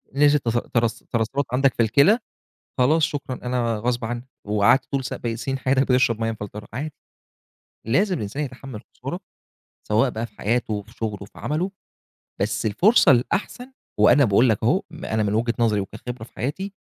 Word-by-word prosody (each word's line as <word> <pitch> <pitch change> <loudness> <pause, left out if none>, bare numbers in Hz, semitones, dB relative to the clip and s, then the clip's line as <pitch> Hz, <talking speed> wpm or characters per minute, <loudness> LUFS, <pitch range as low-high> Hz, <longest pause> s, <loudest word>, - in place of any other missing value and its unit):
نزِلت 145 -1 +4
تس 115 - +2 0.2
ترس 115 -1 +1
ترسَّبْت 120 +4 0
عندك 135 0 +3
في 115 - +2
الكِلى، 140 - +4 0.6
خلاص 155 +6 +4
شكرًا، 140 -3 -1
أنا 120 -3 0
غصب 120 +1 -1
عني، 120 +2 -5 0.2
وقعدت 105 +6 +3
طول 135 -2 0
س - - -4 0.2
سنين 135 +4 -3
حياتك 135 0 +2
بتشرب 125 -4 +2
مَيّة 115 - 0
مفلترة، 105 -1 -8
عادي. 145 +6 -4 0.9
لازم 185 - +2
الإنسان 110 +8 -3
يتحمل 130 -1 -8 0.2
الخسارة - - -5 0.7
سواء 115 +5 +3
بقى 115 +1 -4
في 105 - -26
حياته، 110 -2 -1
في 110 +3 -19
شغله، 105 -4 -4
في - - -17
عمله، 170 +6 -2 0.7
بس 105 +3 -1
الفرصة 185 - +5
الأحسن 210 - 0 0.3
وأنا 140 - +6
باقول 115 +3 +4
لك 110 - 0
أهو 150 +12 +3
م 165 0 -9
أنا 110 -1 0
من 100 - 0
وجهة 115 +2 +1
نظري 110 -3 +2
وكخبرة 110 +4 -6
في - - -14
حياتي، 190 - -4
120 Hz, 170 wpm, -23 LUFS, 110-140 Hz, 0.9 s, وأنا